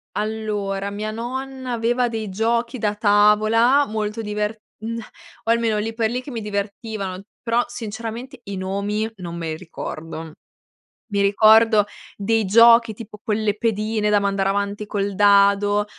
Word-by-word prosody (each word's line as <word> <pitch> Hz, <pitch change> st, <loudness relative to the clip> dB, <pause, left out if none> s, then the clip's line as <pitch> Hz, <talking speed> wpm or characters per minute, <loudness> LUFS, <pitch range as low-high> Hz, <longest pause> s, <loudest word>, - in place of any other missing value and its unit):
Allora, 210 Hz, -2 st, -2 dB
mia 210 Hz, +1 st, -4 dB
nonna 260 Hz, +3 st, -5 dB
aveva 240 Hz, +1 st, +1 dB
dei 220 Hz, -2 st, -4 dB
giochi 235 Hz, +5 st, -1 dB
da 210 Hz, -1 st, 0 dB
tavola 215 Hz, +6 st, +4 dB
molto 215 Hz, +1 st, -3 dB
diver 210 Hz, 0 st, -3 dB, 0.2 s
mhmm, 230 Hz, +1 st, -4 dB
o 280 Hz, 0 st, -7 dB
almeno, 230 Hz, -2 st, +2 dB
lì 220 Hz, +2 st, -2 dB
per 225 Hz, -1 st, 0 dB
lì, 250 Hz, +2 st, -2 dB
che 275 Hz, -, -9 dB
mi 230 Hz, -3 st, -4 dB
divertivano, 200 Hz, -2 st, -4 dB, 0.2 s
però, 235 Hz, +1 st, +2 dB
sinceramente 235 Hz, +2 st, -7 dB
i 200 Hz, -1 st, -5 dB
nomi 200 Hz, +3 st, -2 dB
non 175 Hz, -3 st, -7 dB
me 165 Hz, -1 st, -4 dB
li 155 Hz, -, -4 dB
ricordo. 165 Hz, -2 st, -7 dB, 0.8 s
Mi 200 Hz, -, +2 dB
ricordo 215 Hz, +1 st, +5 dB, 0.3 s
dei 220 Hz, +2 st, 0 dB
giochi, 230 Hz, +2 st, +6 dB
tipo 210 Hz, -1 st, -10 dB
quelle 215 Hz, -1 st, -1 dB
pedine 215 Hz, -1 st, 0 dB
da 210 Hz, 0 st, +4 dB
mandare 195 Hz, -1 st, 0 dB
avanti 200 Hz, +1 st, -2 dB
col 200 Hz, -1 st, -2 dB
dado, 205 Hz, +1 st, +4 dB
215 Hz, 145 wpm, -22 LUFS, 200-230 Hz, 0.8 s, giochi